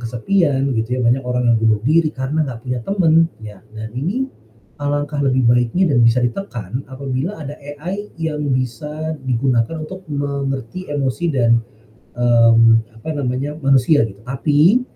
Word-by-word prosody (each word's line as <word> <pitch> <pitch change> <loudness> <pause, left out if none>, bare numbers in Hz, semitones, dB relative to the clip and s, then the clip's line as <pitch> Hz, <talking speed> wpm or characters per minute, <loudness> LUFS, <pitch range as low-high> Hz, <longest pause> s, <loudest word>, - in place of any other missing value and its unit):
kesepian 135 - 0
begitu 120 +1 -1
ya, - - -1
banyak 125 +3 +2
orang 125 0 -1
yang - - +4
bunuh 110 -2 +2
diri, 155 +2 +3
karena 135 +4 -1
nggak 120 -3 -6
punya 125 -1 -2
temen, 165 -4 +3
ya 105 -2 -9 0.2
dan 110 0 -6
ini 215 - -1 0.5
alangkah 145 0 -1
lebih 130 -3 +2
baiknya 120 +8 +3
dan 120 - +4
bisa 115 +2 +4
ditekan 120 - -3
apabila 135 +7 -4
ada 145 -1 -6
AI 160 +9 -7
yang 155 -2 -2
bisa 150 +5 -3
digunakan 130 +3 0
untuk 185 +5 -7
mengerti 140 +3 -3
emosi 145 +3 -1
dan, 115 -4 +3 0.6
mmm, 115 -1 +4
apa 135 +8 -8
namanya, 140 0 -2
manusia, 135 +2 +4
gitu. 100 +1 -14
Tapi 150 - +3
135 Hz, 150 wpm, -19 LUFS, 120-155 Hz, 0.6 s, yang